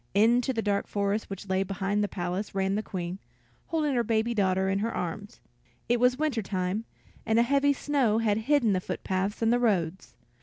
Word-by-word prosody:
Into 235 +5 +4
the 225 -3 -2
dark 200 -1 0
forest 200 +1 -1
which 195 +1 -7
lay 190 0 +1
behind 195 +2 -1
the - - +1
palace 185 +2 -4
ran 195 0 +1
the 210 - 0
Queen, 185 -2 -5 0.5
holding 305 -3 0
her 240 -2 +2
baby 225 +1 +1
daughter 190 -3 +1
in 195 +1 +1
her 225 +3 -1
arms. 205 +3 -5 0.5
It 240 0 +2
was 250 +1 +3
winter 295 -6 0
time, 190 +2 -2 0.4
and 225 0 +1
a 235 - +6
heavy 280 +3 +3
snow 270 -6 +1
had 220 -2 +1
hidden 265 -8 +4
the 185 - 0
foot - - -5
paths 195 +4 -1
and 225 +1 +4
the 245 - +3
roads. 190 -7 0
210 Hz, 200 wpm, -28 LUFS, 195-235 Hz, 0.5 s, a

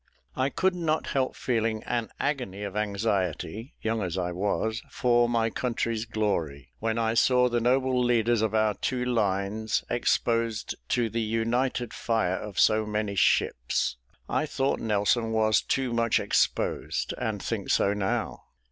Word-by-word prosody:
I 130 +1 +1
could 190 +6 +1
not 160 -3 -1
help 130 -2 0
feeling 115 -3 -1
an 120 -2 -2
agony 125 -9 -2
of 100 -1 -5
anxiety 105 - -2
(young 110 0 0
as 90 -2 -3
I 90 -1 -1
was) 105 +4 -1
for 120 -2 +2
my 115 -1 +1
country's 115 -2 -2
glory, 85 - -2
when 115 0 -1
I 115 -1 +1
saw 125 +1 +4
the 120 -1 0
noble 130 +1 +2
leaders 120 -2 +2
of 110 -1 0
our 110 -1 +3
two 125 +5 -2
lines 110 -1 0
exposed 115 -2 0 0.2
to 120 -2 +2
the 115 +1 -2
united 115 +2 -1
fire 110 -6 0
of 105 -2 -5
so 110 0 +4
many 105 -1 -1
ships. 65 -9 +1 0.3
I 155 - 0
thought 135 -1 0
Nelson 110 +2 +1
was 110 -1 +3
too 130 -3 -1
much 115 -1 +2
exposed, - - 0
and - - -2
think - - -4
so 100 - +3
now. 100 -2 -2
115 Hz, 150 wpm, -27 LUFS, 105-120 Hz, 0.3 s, saw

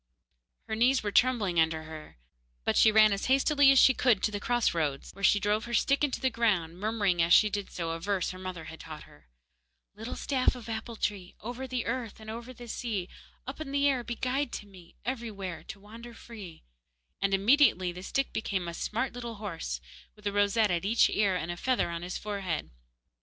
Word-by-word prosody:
Her 220 - -2
knees 250 +3 +3
were 205 - -1
trembling 210 -7 +3
under 160 0 +1
her, 155 - -10 0.5
but - - +1
she 220 - +6
ran 215 -1 +6
as 200 - -3
fast 270 +3 +3
as 280 -2 +6
she 265 - +7
could 245 -6 +2
to 215 - +2
the 205 - -3
cross 240 +2 +1
roads, 150 -5 -2
where 195 - -12
she 205 +1 +5
drove 210 +2 0
her 235 0 -2
stick 275 +4 +2
into 285 -3 0
the 260 - +1
ground, 185 -8 0
murmuring 205 -4 +1
as 170 +1 +4
she 210 -1 +5
did 205 -1 -3
so 165 -2 -4
a 165 - -4
verse 195 +1 -1
her 185 - -9
mother 185 -3 -6
had 160 0 -10
taught 155 -1 -9
her: 75 -2 -19 0.7
Little 225 +3 -6
staff 260 -2 +1
of 240 -2 -10
apple 225 +1 -5
tree, 195 -4 -3
Over 245 +4 -6
the 250 -2 -3
earth 230 -2 -3
and 220 0 -8
over 235 +3 -7
the 240 -1 -11
sea, 215 -6 -3 0.4
Up 265 +4 -7
in 285 -3 -5
the 280 0 +2
air 260 -3 +1
be 235 0 -4
guide 255 +2 -1
to - - -5
me, 185 -4 -16
Everywhere 210 -8 -4
to 195 - -9
wander 230 +3 -11
free, 210 - -11 0.6
and 195 - +1
immediately 200 -4 +4
the 180 +1 -9
stick 270 +8 -2
became 190 -5 -2
a 170 - -4
smart 225 +8 -2
little 240 -2 -6
horse, 165 - -5 0.3
with 210 - -19
a 205 - +1
rosette 205 +1 +2
at 175 0 0
each 220 +4 +3
ear 200 -3 +2
and 175 -1 -3
a - - -4
feather 250 -5 0
on 170 0 -4
his 180 +1 -4
forehead. 195 - -4
210 Hz, 215 wpm, -29 LUFS, 180-240 Hz, 0.7 s, she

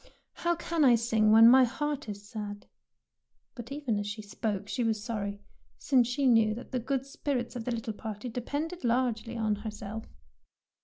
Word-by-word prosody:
'' - - -37
'' - - -56
How 345 0 +2
can 335 -1 0
I 250 -3 +7
sing 225 -2 +2
when 225 +1 +9
my 260 +2 +8
heart 290 +1 -2
is 205 0 -7
sad? 205 -2 -6 0.4
" - - -51
But 240 0 -9
even 275 -7 -1
as 205 - -3
she 210 +1 -5
spoke 205 -1 -3
she 245 - -1
was 220 -2 0
sorry, 205 -3 -4 0.3
since 255 -4 +3
she 270 +3 -1
knew 225 -4 +4
that 245 - -9
the 255 - 0
good 265 +2 -2
spirits 270 -3 -3
of 235 -2 -5
the 250 - -1
little 225 -1 -3
party 215 +2 -6
depended 285 +9 -4
largely 235 -1 0
on 215 -2 0
herself. 215 +1 -6
230 Hz, 195 wpm, -29 LUFS, 215-255 Hz, 0.4 s, when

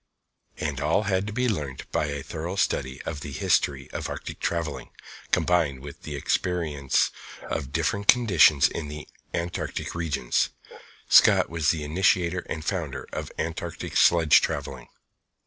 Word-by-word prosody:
All 80 +8 +2
had 100 -1 0
to - - -4
be 125 +3 0
learnt 75 - -4
by 75 - 0
a 70 -1 -4
thorough 85 +4 -5
study 65 -9 -1
of 75 -3 -5
the 75 - -6
history 65 0 +1
of - - -4
Arctic - - -6
travelling, 80 -7 -3 0.4
combined 75 -7 +1
with 70 +1 -10
experience 75 -1 0 0.3
of 65 - -4
different 100 +7 -1
conditions 95 - +6
in 80 - -5
the 75 +1 -8 0.2
Antarctic 85 0 -3
Regions. 80 -7 0 0.6
Scott - - +6
was 80 -3 +1
the 80 -2 0
initiator 90 +2 +1
and 80 0 -4
founder 85 -9 -3
of - - -5
Antarctic 85 +1 -4
sledge 85 -3 +6
travelling. - - -4
80 Hz, 135 wpm, -26 LUFS, 70-90 Hz, 0.6 s, conditions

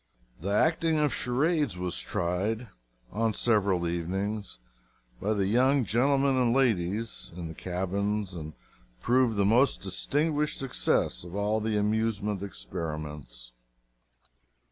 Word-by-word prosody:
The 90 +5 -4
acting 160 +9 +2
of 150 -4 +2
charades 140 - 0
was 90 -1 -3
tried 100 +7 -2 0.4
on 110 0 0
several 100 -6 +2
evenings 95 - -3 0.6
by 110 +2 +1
the 100 -2 +1
young 130 +5 +3
gentlemen 135 +5 +2
and 125 -1 +3
ladies, 110 -4 0
in 85 -2 -5
the - - -7
cabins, 95 +3 -2
and 80 -3 -7 0.5
proved 120 - +2
the 100 - +3
most 120 +7 +3
distinguished 150 0 0
success 135 -8 0
of 85 +1 -9
all 105 +2 +1
the 110 0 0
amusement 105 -1 0
experiments. 75 -6 -6
105 Hz, 120 wpm, -28 LUFS, 90-125 Hz, 0.6 s, young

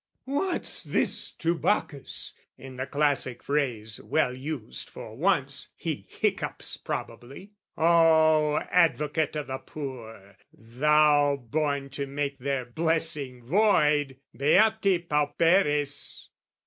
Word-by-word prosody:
"What's 290 +7 -1
this - - 0
to 170 +1 -1
Bacchus?" 155 -6 -1 0.2
(in 135 -1 -11
the 130 +1 -3
classic 140 -4 0
phrase, 120 -7 -2
Well 140 -5 +1
used, 130 -2 -5
for - - -10
once) - - 0
he - - -4
hiccups - - -2
probably. 140 - -7 0.3
O 160 -2 +4
Advocate 155 -3 +2
o' 150 - -2
the 130 -1 -5
poor, 115 -9 -9
thou 145 +5 +3
born 140 +1 -2
to 140 0 -4
make 140 0 -3
Their 135 -1 -2
blessing 145 -3 -1
void 150 - +2 0.2
beati 190 +3 +3
pauperes! 150 0 +1
145 Hz, 105 wpm, -27 LUFS, 135-160 Hz, 0.3 s, O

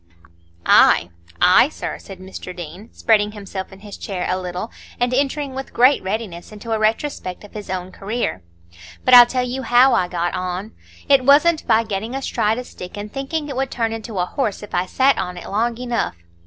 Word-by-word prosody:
"Ay, 85 - +5 0.3
ay, - - +6
sir," - - -6
said 195 - -11
Mr 185 -1 -9
Deane, 175 +6 -9
spreading 210 -2 +2
himself 200 -2 -7
in 190 0 -14
his 205 -1 -9
chair 185 -3 -4
a 185 - +1
little, 180 +4 -5 0.3
and 245 +1 +1
entering 280 +1 0
with 270 +1 -7
great 255 +4 +5
readiness 190 -3 -5
into 215 +2 -8
a 220 - +1
retrospect 215 -4 -1
of 210 - -14
his 210 -1 -8
own 185 0 -4
career. 205 - -3 0.6
"But 255 - +4
I'll 245 -1 +11
tell 250 0 -1
you 260 +2 -3
how 255 +1 +5
I 180 - +2
got 175 -1 -2
on. 185 +3 -4 0.4
It 275 -2 +5
wasn't 300 +4 +4
by 225 0 +4
getting 220 +3 -4
astride 225 -5 0
a 250 - -4
stick 180 -5 -10
and 205 +1 -7
thinking 290 +3 -3
it 280 - -5
would 265 0 -1
turn 230 -3 -1
into 225 -2 -6
a 180 - +1
horse 215 0 -2
if 210 - -11
I 180 +1 0
sat 270 +5 +3
on 180 -1 -4
it 175 - -8
long 230 +3 0
enough. 240 - -2
220 Hz, 200 wpm, -20 LUFS, 190-250 Hz, 0.6 s, I'll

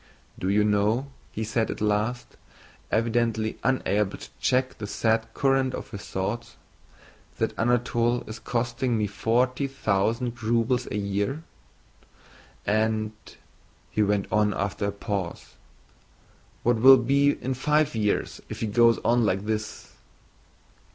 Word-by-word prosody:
"Do 95 - -1
you 105 +1 +3
know," 105 +6 +1 0.2
he 110 - -4
said 110 +1 0
at - - -4
last, 105 +4 -1 0.5
evidently 115 -1 0
unable 105 -6 +1
to - - -11
check 130 0 +1
the 105 - -4
sad 110 +2 0
current 135 -1 +2
of - - -8
his 100 -1 -7
thoughts, 115 +5 -3 0.8
"that - - 0
Anatole 120 0 +1
is 110 +1 -7
costing 120 +1 -1
me 105 - +1
forty 125 +7 0
thousand 115 -1 -1
rubles 120 +2 +1
a - - -3
year? 100 +9 -2 1.2
And," 110 0 +1 0.8
he 110 - 0
went 100 -1 +2
on 105 -1 +2
after 100 +1 -2
a - - -1
pause, 100 -3 -5 1.1
"what 120 0 +3
will 130 +4 +9
it 120 - -4
be 140 +2 +4
in 130 - -3
five 150 +3 +1
years, 105 -2 -1
if - - -7
he - - +1
goes 115 +2 +4
on 120 0 +3
like 95 -1 0
this?" 110 0 -4
115 Hz, 135 wpm, -26 LUFS, 105-125 Hz, 1.2 s, will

